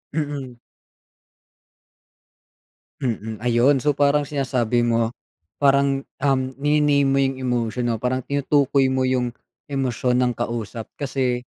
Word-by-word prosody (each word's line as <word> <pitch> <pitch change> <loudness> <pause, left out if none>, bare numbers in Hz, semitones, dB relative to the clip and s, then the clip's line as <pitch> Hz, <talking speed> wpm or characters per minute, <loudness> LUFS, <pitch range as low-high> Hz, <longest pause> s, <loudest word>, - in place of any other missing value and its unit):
Mm. 145 -5 -3 2.5
Mm, 110 -2 -3
ayun. 125 +4 +4
So, 145 +3 +1
parang 145 +1 +2
sinasabi 125 -4 0
mo, 115 -1 +1 0.5
parang, 140 -1 +3 0.2
um, 135 -2 +3 0.2
nini-name 145 0 +2
mo 135 0 +2
yung 135 -1 0
emosyon 120 -2 -1
o 110 - -3
parang 125 +1 -1
tinutukoy 140 0 +2
mo 130 0 0
yung 125 -2 0 0.3
emosyon 130 -3 0
ng 125 - +1
kausap 115 -1 -4
kasi 130 -3 -1
130 Hz, 115 wpm, -22 LUFS, 120-140 Hz, 2.5 s, ayun